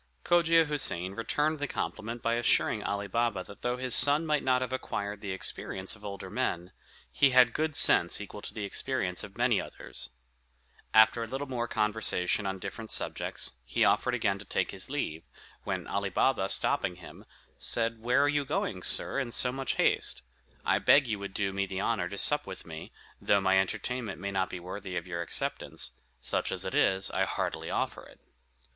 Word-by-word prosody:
Cogia 165 Hz, -1 st, +4 dB
Houssain 95 Hz, -, 0 dB
returned 150 Hz, +7 st, -1 dB
the 145 Hz, -, -2 dB
compliment 115 Hz, -1 st, -4 dB
by 115 Hz, -, +1 dB
assuring 115 Hz, -2 st, +2 dB
Ali 100 Hz, 0 st, -2 dB
Baba 115 Hz, -2 st, 0 dB
that 100 Hz, -, -14 dB
though 125 Hz, 0 st, -1 dB
his 130 Hz, -1 st, -2 dB
son 145 Hz, +3 st, +5 dB
might 150 Hz, -2 st, +1 dB
not 130 Hz, -1 st, +2 dB
have 130 Hz, 0 st, -5 dB
acquired 100 Hz, -5 st, -4 dB
the 100 Hz, -, -6 dB
experience 95 Hz, +1 st, -1 dB
of 105 Hz, -, -17 dB
older 100 Hz, -2 st, -7 dB
men, 85 Hz, +1 st, -2 dB, 0.4 s
he 140 Hz, -, +4 dB
had 125 Hz, -2 st, +5 dB
good 155 Hz, -1 st, -1 dB
sense 85 Hz, -, +5 dB
equal 105 Hz, 0 st, -8 dB
to -, -, -7 dB
the 105 Hz, -, -6 dB
experience 95 Hz, -4 st, -1 dB
of 100 Hz, +1 st, -10 dB
many 120 Hz, -3 st, +2 dB
others. 65 Hz, -, -8 dB, 0.8 s
After 110 Hz, +2 st, +5 dB
a -, -, -5 dB
little 135 Hz, +4 st, -4 dB
more 125 Hz, -3 st, -3 dB
conversation 105 Hz, -3 st, +1 dB
on 95 Hz, 0 st, -3 dB
different 110 Hz, +4 st, -7 dB
subjects, -, -, -1 dB
he -, -, +1 dB
offered -, -, +2 dB
again 100 Hz, 0 st, 0 dB
to 100 Hz, -, -10 dB
take -, -, -1 dB
his -, -, -4 dB
leave, 80 Hz, +1 st, -4 dB, 0.4 s
when -, -, -3 dB
Ali -, -, -2 dB
Baba, -, -, +1 dB
stopping 90 Hz, -, +2 dB
him, 90 Hz, -1 st, -13 dB, 0.4 s
said, 115 Hz, -1 st, 0 dB
"Where 125 Hz, +4 st, +3 dB
are -, -, +3 dB
you 145 Hz, 0 st, +1 dB
going, 135 Hz, -, -2 dB
sir, -, -, +3 dB
in 130 Hz, -3 st, -2 dB
so 125 Hz, +1 st, +3 dB
much 135 Hz, 0 st, -2 dB
haste? -, -, +1 dB, 0.4 s
I -, -, +3 dB
beg 145 Hz, 0 st, +5 dB
you 110 Hz, -4 st, -3 dB
would 100 Hz, -1 st, -7 dB
do 100 Hz, -2 st, -1 dB
me 100 Hz, 0 st, -1 dB
the 95 Hz, 0 st, -4 dB
honor 100 Hz, -6 st, -1 dB
to 100 Hz, -, -7 dB
sup 145 Hz, +5 st, +3 dB
with 95 Hz, -, -8 dB
me, 80 Hz, -1 st, -9 dB, 0.3 s
though 100 Hz, -, +3 dB
my 95 Hz, 0 st, +3 dB
entertainment 110 Hz, +2 st, -3 dB
may 100 Hz, +1 st, -4 dB
not 95 Hz, -1 st, 0 dB
be 90 Hz, -, -6 dB
worthy 95 Hz, +1 st, -6 dB
of 85 Hz, -, -4 dB
your 85 Hz, -2 st, -4 dB
acceptance; 85 Hz, -, 0 dB, 0.3 s
such -, -, -1 dB
as -, -, -1 dB
it -, -, -4 dB
is, 95 Hz, 0 st, +2 dB
I -, -, +1 dB
heartily -, -, -3 dB
offer -, -, -2 dB
it." -, -, -18 dB
105 Hz, 195 wpm, -29 LUFS, 95-125 Hz, 0.8 s, son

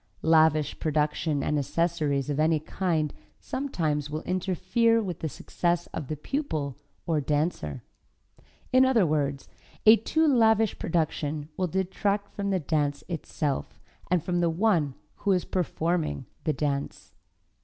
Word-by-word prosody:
Lavish 155 Hz, -2 st, +4 dB
production 150 Hz, -1 st, 0 dB
and 150 Hz, -, +1 dB
accessories 150 Hz, -2 st, 0 dB
of 145 Hz, -, -2 dB
any 155 Hz, 0 st, +3 dB
kind 155 Hz, -2 st, -1 dB, 0.3 s
sometimes 155 Hz, -, -2 dB
will 155 Hz, +1 st, -4 dB
interfere 185 Hz, +5 st, +1 dB
with 185 Hz, -7 st, -4 dB
the 160 Hz, -, -2 dB
success 175 Hz, +3 st, -1 dB
of 140 Hz, -, -4 dB
the 155 Hz, -, -3 dB
pupil, 155 Hz, -, -3 dB, 0.3 s
or 160 Hz, -3 st, +1 dB
dancer. 145 Hz, -, -1 dB, 0.9 s
In 255 Hz, 0 st, +7 dB
other 255 Hz, -7 st, +4 dB
words, 145 Hz, -3 st, -1 dB, 0.4 s
a 220 Hz, +1 st, +9 dB
too 315 Hz, +9 st, +1 dB
lavish 225 Hz, -5 st, +3 dB
production 155 Hz, -2 st, -1 dB
will 185 Hz, -, 0 dB
detract 195 Hz, +3 st, -1 dB
from 200 Hz, -1 st, -2 dB
the 190 Hz, -1 st, +1 dB
dance 145 Hz, -2 st, -1 dB
itself 155 Hz, -4 st, -3 dB, 0.3 s
and 180 Hz, -3 st, +2 dB
from 175 Hz, -1 st, 0 dB
the 170 Hz, -1 st, +2 dB
one 165 Hz, -6 st, +1 dB, 0.2 s
who 200 Hz, -, +1 dB
is 180 Hz, -, 0 dB
performing 165 Hz, -, -1 dB, 0.2 s
the 155 Hz, -, +2 dB
dance. 140 Hz, -2 st, -3 dB
160 Hz, 135 wpm, -27 LUFS, 150-190 Hz, 0.9 s, a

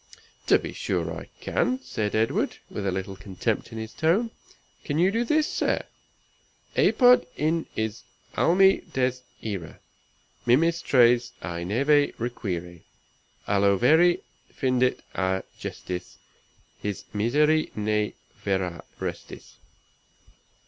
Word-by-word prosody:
"To -, -, +6 dB
be -, -, -6 dB
sure -, -, -2 dB
I -, -, -9 dB
can," 255 Hz, +1 st, 0 dB
said 105 Hz, -, -2 dB
Edward, 110 Hz, +1 st, +1 dB
with 100 Hz, -1 st, -3 dB
a -, -, +1 dB
little 95 Hz, +1 st, -4 dB
contempt 95 Hz, -1 st, -3 dB
in 115 Hz, -, -7 dB
his 110 Hz, 0 st, -6 dB
tone. 195 Hz, +9 st, +1 dB, 0.5 s
"Can 145 Hz, -, -2 dB
you 180 Hz, +4 st, +4 dB
do 230 Hz, +3 st, +1 dB
this, 305 Hz, +5 st, +2 dB
sir? -, -, 0 dB, 0.9 s
"Apud 250 Hz, -1 st, +5 dB
in 160 Hz, +2 st, 0 dB
is 110 Hz, +1 st, -2 dB, 0.3 s
almi 190 Hz, +3 st, +4 dB
des 130 Hz, -1 st, +2 dB, 0.3 s
ire, 95 Hz, -7 st, -5 dB, 0.7 s
Mimis 165 Hz, +7 st, +3 dB
tres 120 Hz, -3 st, +4 dB
i 85 Hz, 0 st, -4 dB
neve 140 Hz, +10 st, +2 dB
require, 90 Hz, -8 st, -4 dB, 0.7 s
Alo 100 Hz, -1 st, +3 dB
veri 160 Hz, -, +4 dB, 0.3 s
findit 130 Hz, -1 st, +1 dB
a 95 Hz, 0 st, 0 dB, 0.2 s
gestis, 90 Hz, 0 st, -6 dB, 0.6 s
His 105 Hz, -2 st, -4 dB
miseri 150 Hz, +9 st, +2 dB
ne 105 Hz, 0 st, 0 dB, 0.3 s
ver 95 Hz, -1 st, +1 dB
at 85 Hz, -2 st, -6 dB
restis." -, -, -7 dB
120 Hz, 120 wpm, -26 LUFS, 100-155 Hz, 0.9 s, To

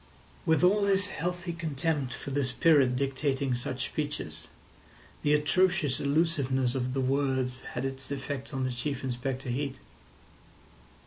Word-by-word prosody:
With 160 Hz, +2 st, +4 dB
all 200 Hz, +3 st, +5 dB
his 200 Hz, 0 st, +2 dB
healthy 175 Hz, +1 st, -3 dB
contempt 155 Hz, -4 st, -1 dB
for 140 Hz, -, -6 dB
the 140 Hz, +1 st, +1 dB
spirit 130 Hz, 0 st, +4 dB
dictating 135 Hz, 0 st, 0 dB
such 125 Hz, 0 st, -2 dB
speeches, 145 Hz, -, -4 dB, 0.7 s
the 150 Hz, 0 st, +4 dB
atrocious 175 Hz, -1 st, +2 dB
allusiveness 140 Hz, -4 st, +1 dB
of 125 Hz, 0 st, -1 dB
the 135 Hz, -, +1 dB
words 130 Hz, -1 st, +1 dB
had 125 Hz, +2 st, -2 dB
its 135 Hz, -1 st, -4 dB
effect 140 Hz, 0 st, -4 dB
on 135 Hz, -2 st, -1 dB
Chief 125 Hz, +2 st, -3 dB
Inspector 130 Hz, +1 st, -3 dB
Heat. 135 Hz, +2 st, -2 dB
140 Hz, 130 wpm, -29 LUFS, 130-155 Hz, 0.7 s, all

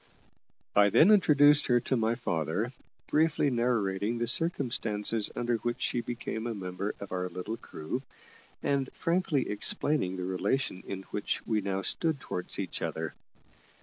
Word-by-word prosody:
I 100 Hz, 0 st, +6 dB
then 160 Hz, -, +6 dB
introduced 150 Hz, -7 st, +6 dB
her 120 Hz, -1 st, +4 dB
to 130 Hz, -, 0 dB
my 115 Hz, 0 st, +1 dB
father, 95 Hz, -, -1 dB, 0.3 s
briefly 150 Hz, -2 st, +2 dB
narrating 115 Hz, -3 st, 0 dB
the 120 Hz, -, 0 dB
circumstances 115 Hz, -7 st, +1 dB
under 120 Hz, -1 st, 0 dB
which 120 Hz, +2 st, -3 dB
she 120 Hz, -, 0 dB
became 120 Hz, -1 st, -4 dB
a 115 Hz, -, -3 dB
member 95 Hz, +1 st, -4 dB
of 100 Hz, -, -8 dB
our 90 Hz, 0 st, -2 dB
little 90 Hz, +5 st, -5 dB
crew, 80 Hz, +9 st, -5 dB, 0.6 s
and 140 Hz, -2 st, 0 dB
frankly 165 Hz, -5 st, 0 dB
explaining 105 Hz, -1 st, 0 dB
the 90 Hz, -, -3 dB
relation 95 Hz, +3 st, -1 dB
in 95 Hz, -1 st, -5 dB
which 105 Hz, -, -2 dB
we 110 Hz, -2 st, +1 dB
now 95 Hz, 0 st, -2 dB
stood 160 Hz, -, 0 dB
towards 90 Hz, -7 st, -4 dB
each -, -, -4 dB
other. -, -, -3 dB
115 Hz, 150 wpm, -30 LUFS, 95-135 Hz, 0.6 s, I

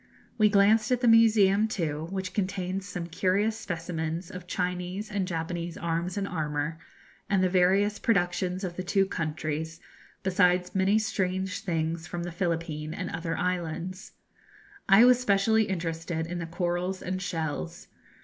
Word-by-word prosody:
We 215 Hz, 0 st, +6 dB
glanced 215 Hz, +3 st, +4 dB
at 250 Hz, -1 st, +2 dB
the 245 Hz, -, +3 dB
museum 220 Hz, -2 st, +5 dB
too, 160 Hz, -6 st, -2 dB
which 190 Hz, -1 st, -4 dB
contains 190 Hz, -1 st, -2 dB
some 175 Hz, -3 st, -4 dB
curious 190 Hz, +5 st, +1 dB
specimens 170 Hz, -3 st, -4 dB
of 180 Hz, -1 st, -9 dB
Chinese 180 Hz, +3 st, -3 dB
and 200 Hz, -3 st, -1 dB
Japanese 170 Hz, 0 st, -3 dB
arms 170 Hz, +2 st, -2 dB
and 200 Hz, -1 st, -1 dB
armour, 155 Hz, -2 st, -2 dB, 0.5 s
and 195 Hz, -2 st, +3 dB
the 185 Hz, -, +3 dB
various 195 Hz, +3 st, +3 dB
productions 180 Hz, -2 st, 0 dB
of 175 Hz, -2 st, -4 dB
the 185 Hz, -, -2 dB
two 195 Hz, +2 st, +2 dB
countries, 160 Hz, -2 st, -3 dB, 0.4 s
besides 180 Hz, -1 st, +2 dB
many 195 Hz, +2 st, +3 dB
strange 190 Hz, -2 st, -1 dB
things 165 Hz, -3 st, -2 dB
from 170 Hz, +1 st, -4 dB
the 175 Hz, -, -4 dB
Philippine 165 Hz, -3 st, -2 dB
and -, -, -4 dB
other 165 Hz, 0 st, -3 dB
islands. 180 Hz, +1 st, -3 dB, 0.8 s
I 200 Hz, +5 st, +8 dB
was 250 Hz, 0 st, +6 dB
specially 220 Hz, -1 st, +3 dB
interested 165 Hz, -3 st, -3 dB
in 175 Hz, +1 st, -4 dB
the 165 Hz, -, -4 dB
corals 175 Hz, +2 st, -2 dB
and 185 Hz, +1 st, -3 dB
shells. 160 Hz, -, -4 dB
180 Hz, 150 wpm, -28 LUFS, 165-195 Hz, 0.8 s, I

